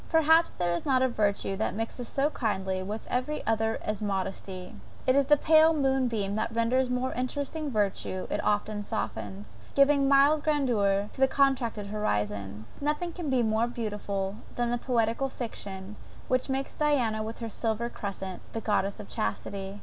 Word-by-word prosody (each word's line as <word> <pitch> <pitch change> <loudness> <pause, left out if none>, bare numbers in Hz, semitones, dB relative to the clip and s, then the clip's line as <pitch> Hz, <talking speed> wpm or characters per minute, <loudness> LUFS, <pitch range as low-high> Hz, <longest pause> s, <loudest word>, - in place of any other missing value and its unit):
Perhaps 320 +1 +5
there 175 -1 0
is 170 - -2
not 260 -3 +3
a - - +4
virtue 205 -4 0
that 215 - -1
mixes 230 +2 -4
so 280 +5 +1
kindly 190 -6 -1
with 210 +4 -5
every 255 +5 -2
other 225 0 +1
as 215 0 -2
modesty. 190 -2 -3 0.3
It 255 - +4
is 280 0 +4
the 295 +2 +5
pale 315 +2 +6
moon 265 -3 +2
beam 205 -4 -1
that 220 - -1
renders 240 +3 +2
more 250 +1 -1
interesting 285 +4 -2
every 210 -7 +2
virtue 185 -1 -5
it - - 0 0.4
softens, 105 - -5 0.2
giving 275 0 +5
mild 285 +2 +5
grandeur 215 -9 +2
to 265 - -8
the 265 - +7
contracted 260 -6 +1
horizon. 105 - -2 0.2
Nothing 300 +4 -1
can 335 -4 -4
be 255 -2 +3
more 220 +1 +2
beautiful 205 -4 -3 0.2
than 240 -1 0
the 240 - 0
poetical 235 +2 +1
fiction, 200 -5 -7 0.3
which 255 +1 +1
makes 270 +1 -2
Diana 255 -8 +1
with 220 +1 -5
her 230 - -5
silver 225 +1 -1
crescent, 195 -5 -5
the 225 - -3
goddess 200 -2 0
of 205 - -8
chastity. 195 - -3
225 Hz, 170 wpm, -28 LUFS, 200-270 Hz, 0.4 s, the